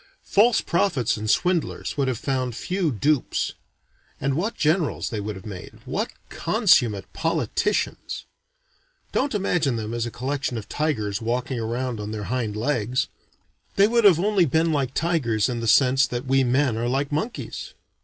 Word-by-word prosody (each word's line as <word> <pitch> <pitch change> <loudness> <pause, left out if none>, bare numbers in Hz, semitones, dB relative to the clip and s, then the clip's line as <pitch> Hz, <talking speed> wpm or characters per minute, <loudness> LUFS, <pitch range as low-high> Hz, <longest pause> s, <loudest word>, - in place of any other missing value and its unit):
False 220 +3 +4
prophets 170 - +1
and 110 0 -4
swindlers 180 +4 0
would 140 -3 0
have 130 -3 0
found 130 -2 -2
few 180 +2 -1
dupes. 140 +4 0 0.7
And 135 +1 0
what 190 +11 -1
generals 155 -2 +1
they 110 - -2
would 105 +1 -4
have 95 - -11
made! 95 -4 -8
what - - -2 0.2
consummate 145 - +2
politicians! 165 0 -1 0.9
Don't 275 -3 0
imagine 175 -9 +1
them 110 0 -4
as 120 0 -1
a - - -3
collection 135 0 -3
of 110 - -6
tigers 110 -10 -1
walking 125 +2 -1
around 120 +1 -2
on 105 0 -5
their 105 -1 -4
hind 115 -5 -1
legs. 125 0 0 0.7
They 200 +1 +6
would 235 +1 +2
have 180 -5 +7
only 200 -1 +3
been 160 +4 +2
like 135 -4 -1
tigers 135 -11 +1
in 120 -2 -2
the 115 - -3
sense 130 +3 +5
that 120 +1 -4
we 135 0 +3
men 130 -1 +2
are 120 - -1
like 140 +3 -1
monkeys. 215 +11 -4
130 Hz, 165 wpm, -24 LUFS, 115-165 Hz, 0.9 s, have